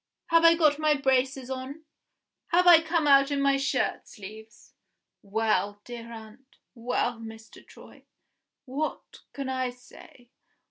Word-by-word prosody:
Have 330 0 +4
I 335 0 +7
got 305 -3 +2
my 305 -1 +3
braces 265 -1 0
on? 265 +4 -7 0.6
Have 360 +1 +2
I 345 -2 +8
come 325 -1 -1
out 275 0 +5
in 285 -1 -1
my 275 0 +3
shirt 275 +1 -1
sleeves? 220 +2 -13 0.5
Well, 205 0 -1
dear 235 -1 -9
aunt; 225 +4 -13 0.2
well, 240 0 -2
Mr. 225 0 -12
Troy! - - -17 0.6
what 290 +4 -5
can 275 -1 -5
I 260 -1 -2
say? 245 0 -17
260 Hz, 135 wpm, -27 LUFS, 230-290 Hz, 0.6 s, I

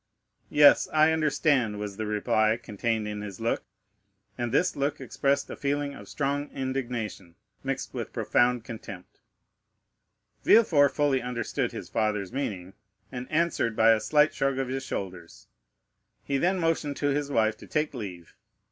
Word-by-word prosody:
"Yes, 145 -1 +6
I 155 +1 +5
understand," 145 -8 +1
was 105 -1 -5
the 110 - -3
reply 110 +1 +2
contained 110 -1 -2
in 105 0 -4
his 100 -3 -7
look; 115 +1 0 0.7
and 120 -1 -3
this 180 +8 +2
look 140 +1 -1
expressed 140 +2 0
a - - -5
feeling 145 0 -1
of - - -11
strong 145 0 -2
indignation, 120 -9 -4 0.3
mixed - - -3
with - - -5
profound 120 -1 +2
contempt. 100 -5 -10 1.2
Villefort 160 -11 +5
fully 145 -3 +2
understood 125 -1 -2
his - - -7
father's 105 -2 -1
meaning, 95 -9 -4 0.4
and 125 -1 -6
answered 155 -8 +1
by 110 +1 +6
a 110 - +4
slight 150 +7 +3
shrug 135 -1 0
of 135 -1 -2
his 135 +1 -3
shoulders. 90 -8 -6 0.8
He 140 -1 -1
then 185 +4 +2
motioned 160 -4 0
to 145 - 0
his 145 0 -1
wife 110 -5 +2
to - - -13
take 150 -1 -1
leave. 95 -9 -8
125 Hz, 150 wpm, -27 LUFS, 110-145 Hz, 1.2 s, Yes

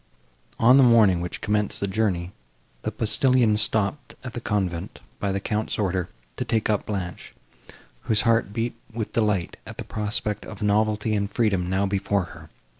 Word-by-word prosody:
On 125 +4 +6
the 135 - +7
morning, 110 -8 +5
which 90 - -5
commenced 105 0 0
the - - 0
journey, 95 -3 -1 0.5
the - - -3
postillions 115 -2 +3
stopped 110 +6 0
at 125 -2 -7
the 120 - -5
convent, 95 -5 -2 0.2
by 100 - -1
the 100 - -1
Count's 105 +2 -2
order, 95 -3 -1 0.3
to - - -1
take 110 -1 0
up 105 - -1
Blanche, 95 -4 -5 0.7
whose 110 -1 +3
heart 115 -3 +2
beat 115 +2 -2 0.2
with 110 -1 -4
delight, 105 -6 0
at - - -9
the - - -4
prospect 105 -1 -2
of 105 -1 -8
novelty 105 +1 +1
and 100 -1 0
freedom 100 -5 0
now 95 +2 +1
before 100 0 0
her. - - -13
105 Hz, 170 wpm, -24 LUFS, 95-110 Hz, 0.7 s, the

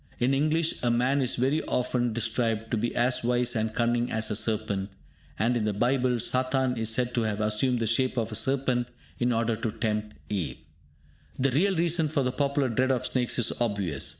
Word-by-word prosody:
In 125 +2 +1
English 155 +4 0
a 120 - +1
man 125 +4 +2
is 125 - +1
very 135 +5 +1
often 125 -1 0
described 115 0 -1
to - - +2
be 120 +2 -2
as 125 +1 +2
wise 125 0 +1
and 110 0 0
cunning 120 +1 0
as 110 0 0
a - - 0
serpent. 105 -3 -1 0.5
And 115 +4 +1
in 115 - 0
the 105 - 0
Bible, 125 +3 +1
Satan 130 +2 +1
is 115 -2 0
said 125 +2 0
to 120 - +1
have 110 -2 -1
assumed 110 +4 +1
the 115 - 0
shape 130 +3 +1
of 115 -1 -1
a - - -4
serpent 125 +1 +1 0.3
in 125 0 +1
order 115 -1 +1
to 115 -1 -2
tempt 105 -1 -3
Eve. 85 -11 -3 0.8
The 135 +1 +1
real 190 +9 +2
reason 165 -1 +1
for 145 -2 0
the 125 - 0
popular 140 0 0
dread 130 +3 +1
of 130 -2 0
snakes 125 -2 0
is 120 -2 +1
obvious. 100 -10 -1
120 Hz, 205 wpm, -27 LUFS, 110-130 Hz, 0.8 s, man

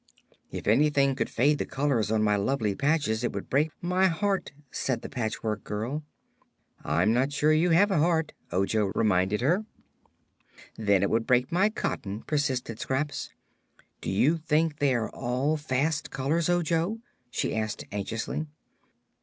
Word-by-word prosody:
"If - - -6
anything 140 +3 +3
should - - -1
fade 145 +5 +2
the - - -1
colors 135 -6 0
of 110 0 +2
my 105 -1 +3
lovely 105 0 0
patches 140 -3 0
it 120 - -1
would 100 - -6
break 145 +4 +3
my 180 +2 +3
heart," 195 +2 -1 0.2
said 125 -4 -2
the - - -6
Patchwork 110 -3 -3
Girl. 115 +9 -3 0.8
"I'm 85 +9 +2
not 130 +4 +1
sure 150 +2 +3
you 165 +3 +3
have 195 +5 +4
a 180 - +2
heart," 160 -1 +1 0.2
Ojo 95 +3 +1
reminded 100 0 +2
her. 175 - +2 1.1
"Then 100 -3 +2
it 100 - +1
would 115 0 +1
break 125 0 +3
my 190 +5 +3
cotton," 105 - -4
persisted 135 -6 -1
Scraps. 145 +3 -2 0.7
"Do - - -4
you 135 - +3
think 155 -1 0
they 140 -3 +3
are 110 -2 -1
all 130 +5 -1
fast 150 +1 -1
colors, 150 +6 0
Ojo?" 175 +3 +1 0.3
she - - -2
asked 110 -1 -3
anxiously. 110 +9 -3
135 Hz, 155 wpm, -27 LUFS, 110-155 Hz, 1.1 s, have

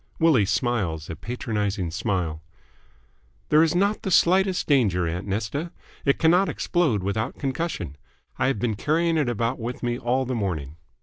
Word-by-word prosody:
Willie 150 - +4
smiles 90 -6 -1
a - - -5
patronising 105 -6 -3
smile. 85 -3 -2 1.1
"There 155 +1 +6
is 165 0 +2
not 200 +4 +1
the - - -3
slightest 185 +1 +3
danger, 100 - +2
aunt 90 +5 -4
Nesta. 110 - -2 0.3
It 140 - +3
cannot 175 +4 +4
explode 150 - 0
without 105 +3 -2
concussion. 135 - -3 0.4
I - - +2
have 135 - +1
been 110 +1 0
carrying 165 +7 +1
it 150 -6 +1
about 120 +2 -1
with 120 +2 -5
me 120 0 -1
all 130 +2 0
the 130 - -3
morning." 85 - -3
120 Hz, 160 wpm, -24 LUFS, 95-155 Hz, 1.1 s, There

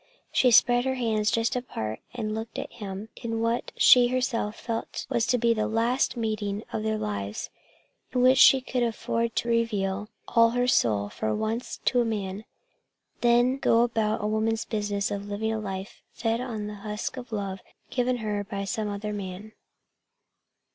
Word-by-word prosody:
She 255 - +4
spread 245 +1 +5
her 260 0 0
hands 220 -4 +1
just 230 +2 +1
apart 110 - -4
and 215 -3 -3
looked 220 +1 -5
at - - -5
him 200 0 -7
in 225 -1 -3
what 230 +1 -1
she 245 -1 +7
herself 245 -4 -1
felt 230 -1 -4
was 235 0 +1
to 250 - +3
be 235 0 +3
the 215 -1 0
last 235 +4 +1
meeting 215 -2 -2
of - - -1
their 220 0 0
lives; 100 - -4 0.6
in 250 -1 +1
which 260 +1 +6
she 270 0 +8
could 255 -1 -2
afford 230 0 -1
to - - -1
reveal 210 -4 0 0.2
all 230 -1 +5
her 245 +1 0
soul 105 - +2
for 110 +1 -2
once 225 - -3
to 245 - +3
a - - +3
man, 205 -5 -2
and 210 - -10 0.8
then 240 +2 +4
go 230 -3 +4
about 220 -3 0
a - - +1
woman's 220 +1 0
business 205 -2 -1
of 200 0 -4
living 220 +2 -2
a 220 - -2
life 195 -1 -6
fed 230 +1 -1
on 225 -5 -4
the 210 0 -6
husks 210 +3 -4
of 245 -1 -11
love 195 -3 -3 0.3
given 250 0 +1
her 205 -1 -1
by 200 -1 -4
some 210 +2 -2
other 205 +1 -4
man. 200 +1 -6
220 Hz, 180 wpm, -27 LUFS, 205-235 Hz, 0.8 s, she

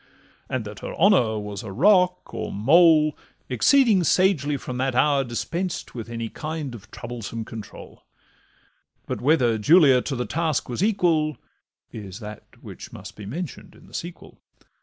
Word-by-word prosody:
And 130 -4 -2
that 105 -1 -8
her - - -6
honour 155 - +3
was 105 -1 -5
a 110 -4 -8
rock, 180 - +3
or - - -4
mole, 155 - +5 0.3
Exceeding 205 - +4
sagely 155 -5 +2
from 125 -1 -6
that 130 0 -1
hour 140 +1 +3
dispensed 170 +9 -4
With 115 -2 -7
any 115 -1 -4
kind 155 +1 -5
of 110 -1 -12
troublesome 115 -1 -6
control; 110 -2 -10 1.0
But - - -4
whether 125 -6 +2
Julia 140 - +6
to 135 - -4
the 125 0 -2
task 160 -2 -1
was 125 +9 -2
equal 170 -8 +1 0.5
Is 100 -2 -8
that 105 -1 -11
which - - -10
must - - -10
be 105 -2 -9
mention'd 160 - -7
in - - -18
the - - -19
sequel. 175 +1 -8
135 Hz, 155 wpm, -24 LUFS, 115-170 Hz, 1.0 s, Julia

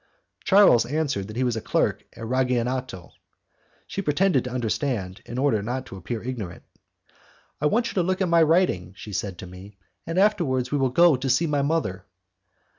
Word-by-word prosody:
Charles 190 - +5
answered 140 -8 -1
that 110 - -9
he 130 - 0
was 120 -2 0
clerk 110 - 0
at 115 - -8
Ragionato. 125 -5 -1 0.7
She 195 - -4
pretended 165 -3 +2
to - - -3
understand, 120 -5 -2
in 120 - -6
order 130 -6 +2
not 125 +5 -4
to - - -10
appear 110 +5 -5
ignorant. 115 -8 -6 1.0
"I 150 - +3
want 235 +9 +1
you - - -7
to 185 - +1
look 185 +2 -1
at 190 - +1
my 170 -1 +4
writing," 155 - +2
she 105 - -9
said 95 -1 -3
to - - -8
me, 95 +3 -12 0.3
"and 165 +2 -3
afterwards 170 -11 +2
we 145 - +1
will 135 -1 +2
go 170 +6 +5
and 130 0 0
see 145 +7 +2
my 145 -3 0
mother." 140 - -1
130 Hz, 185 wpm, -24 LUFS, 110-160 Hz, 1.0 s, Charles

